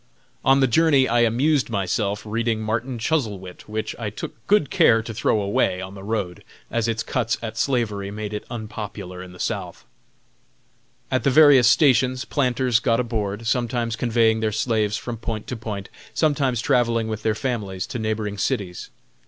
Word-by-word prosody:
On 135 +1 +4
the - - +6
journey 140 0 +4
I 120 +1 +2
amused 125 +5 +2
myself 100 0 -1
reading 115 +1 -1
Martin 115 +4 -2
Chuzzlewit, 105 - -3
which 110 0 -3
I 110 -3 -2
took 105 - -7
good 205 -9 +3
care 115 -1 +4
to 115 - -6
throw 105 - +1
away 100 -2 +1
on 95 +1 -7
the 100 - -10
road, 100 -4 -3 0.3
as 115 -1 0
its 115 0 -1
cuts 115 -1 -1
at 110 -1 -5
slavery 110 -6 -1
made 105 +1 -5
it 105 - -4
unpopular 105 -5 -6
in 90 -1 -10
the 90 - -14
South. - - -4 1.3
At 130 -3 +1
the - - +3
various 135 -3 +7
stations 130 -1 +3
planters 125 -4 +1
got 115 -1 +1
aboard, 110 -3 -2
sometimes 120 0 0
conveying 115 -2 +2
their 110 -1 0
slaves 110 -1 0
from 120 -2 -5
point 110 -1 -4
to 125 - -5
point, 105 -4 -6 0.3
sometimes 140 -6 +1
travelling 115 -2 +2
with 110 -1 -4
their 110 -1 0
families 105 -8 -3
to 120 - -5
neighboring 110 -2 -2
cities. 90 -3 -2
115 Hz, 170 wpm, -23 LUFS, 105-125 Hz, 1.3 s, various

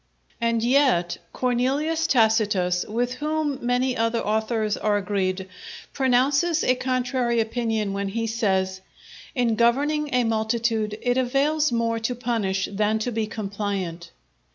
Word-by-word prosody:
And 230 -1 +1
yet 245 -9 +2
Cornelius 275 +6 0
Tacitus, 210 -7 +2
with 240 +3 -1
whom 300 0 -2
many 250 +1 +1
other 230 0 0
authors 220 0 0
are 210 -1 +1
agreed, 190 -1 -2 0.5
pronounces 280 +6 +2
a 255 - +4
contrary 255 -1 0
opinion 225 -2 -1
where 200 0 -2
he 225 +3 -2
says, 190 -4 0 0.6
"_In 235 -3 +2
governing 290 +6 +2
a 250 -1 +2
multitude 220 -1 0
it 245 +1 +2
avails 280 +4 +1
more 230 -1 0
to 230 +2 -2
punish 220 -6 -1
than 210 +2 +1
to 220 +3 -2
be 220 -1 -1
compliant. 195 -5 -4
230 Hz, 130 wpm, -24 LUFS, 210-255 Hz, 0.6 s, a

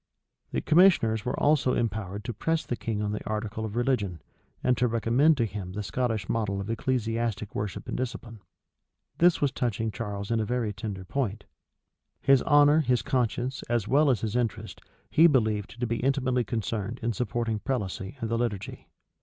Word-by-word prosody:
The - - -1
commissioners 155 - +4
were 125 - -2
also 145 -3 +3
empowered 105 -3 -2
to 120 - -4
press 160 +9 -1
the 120 - -2
king 110 -3 -3
on 105 - -1
the 105 - -4
article 110 0 -3
of 110 0 -6
religion, 120 -8 0 0.4
and 125 0 +3
to 125 - +3
recommend 120 +7 +3
to 115 - +2
him 95 -4 -6
the 105 +1 -3
Scottish 110 0 -1
model 105 -4 -1
of 100 +3 -4
ecclesiastic 115 -3 -1
worship 100 -2 -4
and - - -3
discipline. 120 -3 -5 0.8
This 175 0 +4
was 145 -2 +2
touching 115 -2 -1
Charles 100 0 -5
in 115 - +2
a - - +1
very 115 -1 -1
tender 100 -3 -6
point: 110 -3 -2 0.8
his 135 -2 +4
honor 145 +1 +5
his 125 -5 +1
conscience, 125 +1 -1
as 120 -3 0
well 145 +3 +4
as 125 -5 +2
his 110 0 -2
interest, 120 -3 -2 0.3
he 165 +2 +7
believed 110 -6 0
to 120 - 0
be 115 0 -1
intimately 130 -1 +1
concerned 110 0 -3
in 115 0 0
supporting 115 -1 -2
prelacy 105 -2 -3
and 115 - -1
the 115 - +1
liturgy. 105 -5 -3
115 Hz, 180 wpm, -27 LUFS, 105-125 Hz, 0.8 s, he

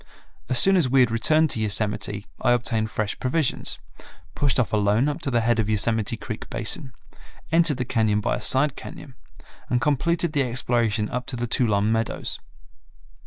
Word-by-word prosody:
As 130 - +2
soon 195 +10 +5
as 155 -8 +2
we 130 +1 +4
had 120 -3 +3
returned 155 +7 +3
to - - -2
Yosemite 105 -1 0 0.2
I 120 - +3
obtained 115 -2 0
fresh 110 -2 -3
provisions, 135 +3 -1 0.6
pushed 140 -4 +1
off 115 - 0
alone 105 +5 +2
up 150 +2 -3
to 140 - -2
the 120 -3 +1
head 115 0 +1
of 110 -1 0
Yosemite 110 +1 0
Creek 110 -1 -7
basin, 120 +5 -2 0.6
entered 165 -4 +3
the 125 - -2
cañon 110 -3 +1
by 105 - -1
a - - -8
side 135 +1 +2
cañon, 135 - -10 0.6
and 125 - +1
completed 155 +5 0
the 145 - +2
exploration 115 -4 0
up 125 +2 -5
to - - -3
the 120 0 -2
Tuolumne 110 -3 +1
Meadows. 115 0 -2
120 Hz, 175 wpm, -24 LUFS, 110-135 Hz, 0.6 s, soon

